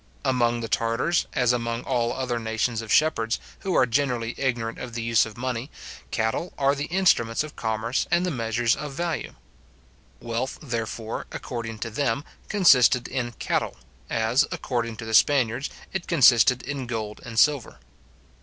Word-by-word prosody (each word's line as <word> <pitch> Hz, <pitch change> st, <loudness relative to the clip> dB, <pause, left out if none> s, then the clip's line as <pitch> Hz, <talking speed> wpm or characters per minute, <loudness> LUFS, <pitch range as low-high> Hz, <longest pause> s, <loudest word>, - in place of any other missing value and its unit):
Among 120 Hz, -2 st, +2 dB
the 115 Hz, -, -3 dB
Tartars, 115 Hz, +10 st, +1 dB
as 125 Hz, -1 st, +3 dB
among 115 Hz, 0 st, -2 dB
all 120 Hz, -3 st, 0 dB
other 125 Hz, -2 st, -2 dB
nations 110 Hz, +1 st, -1 dB
of 110 Hz, -, -7 dB
shepherds, 115 Hz, -8 st, +2 dB, 0.2 s
who 190 Hz, -, -2 dB
are -, -, +5 dB
generally 120 Hz, -2 st, 0 dB
ignorant 120 Hz, -4 st, -2 dB
of 120 Hz, -2 st, -7 dB
the 115 Hz, -, -3 dB
use 115 Hz, -1 st, +3 dB
of 110 Hz, -, -12 dB
money, 125 Hz, +1 st, -3 dB, 0.4 s
cattle 115 Hz, -, -1 dB
are 140 Hz, 0 st, +3 dB
the 145 Hz, 0 st, -3 dB
instruments 160 Hz, -11 st, +2 dB
of 155 Hz, 0 st, -9 dB
commerce 110 Hz, +2 st, -1 dB
and 175 Hz, +1 st, +2 dB
the 180 Hz, -, -1 dB
measures 115 Hz, -2 st, +1 dB
of 150 Hz, -2 st, -6 dB
value. 170 Hz, +2 st, -3 dB, 0.8 s
Wealth, 120 Hz, +3 st, -3 dB
therefore, 115 Hz, -4 st, -4 dB
according 115 Hz, -3 st, -5 dB
to 115 Hz, -, -5 dB
them, 130 Hz, +2 st, 0 dB, 0.3 s
consisted 130 Hz, -, +5 dB
in 120 Hz, -2 st, -3 dB
cattle, -, -, -2 dB, 0.3 s
as, 115 Hz, +5 st, +2 dB
according 115 Hz, -3 st, -2 dB
to 115 Hz, -, -7 dB
the 110 Hz, -, -5 dB
Spaniards, 130 Hz, +1 st, +3 dB, 0.2 s
it 190 Hz, -2 st, -3 dB
consisted 125 Hz, -5 st, +5 dB
in 140 Hz, -3 st, -4 dB
gold 110 Hz, -3 st, -4 dB
and 115 Hz, -1 st, -8 dB
silver. 145 Hz, 0 st, +3 dB
120 Hz, 160 wpm, -25 LUFS, 115-140 Hz, 0.8 s, are